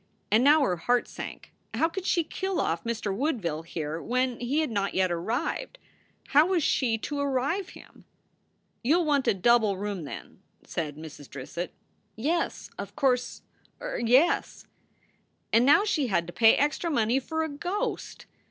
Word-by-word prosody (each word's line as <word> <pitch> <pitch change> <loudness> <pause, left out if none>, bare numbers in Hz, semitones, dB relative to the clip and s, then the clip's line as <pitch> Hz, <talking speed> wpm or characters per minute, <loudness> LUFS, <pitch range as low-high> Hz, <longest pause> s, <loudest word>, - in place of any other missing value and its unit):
And 220 +3 +5
now 295 +3 +6
her 180 -9 +1
heart 245 +9 +1
sank. - - -8 0.2
How 325 - +3
could 370 +3 -5
she 340 - +2
kill 380 +4 -3
off 165 +1 -1
Mr. 220 -4 -2
Woodville 210 - -1
here 160 -1 -5
when 250 0 0
he 270 +6 0
had 310 - -2
not 200 -2 -1
yet 185 -1 +2
arrived? 235 - -2 0.5
How 295 +4 +6
was 365 -4 +1
she 235 -5 +2
to 285 +6 -4
arrive 285 +7 0
him? - - -15 0.8
"You 295 +8 +4
ll 350 - +1
want 285 -3 +1
a - - +5
double 215 0 +3
room, 200 -4 -4
then," 140 - -9 0.2
said 150 -3 -4
Mrs. 155 -3 -10
Drissett. 145 +6 -6 0.4
"Yes, 310 +10 -2
of - - -6
course 255 -4 0 0.4
er - - -4
yes." 260 +9 +3 0.9
And 235 +3 +5
now 295 +8 +6
she 305 -10 +1
had 170 -6 +1
to 175 - -9
pay 225 -1 +6
extra 295 +4 0
money 240 -3 +2
for 320 +4 -2
a 315 - -3
ghost 355 +8 -4
250 Hz, 165 wpm, -27 LUFS, 195-310 Hz, 0.9 s, now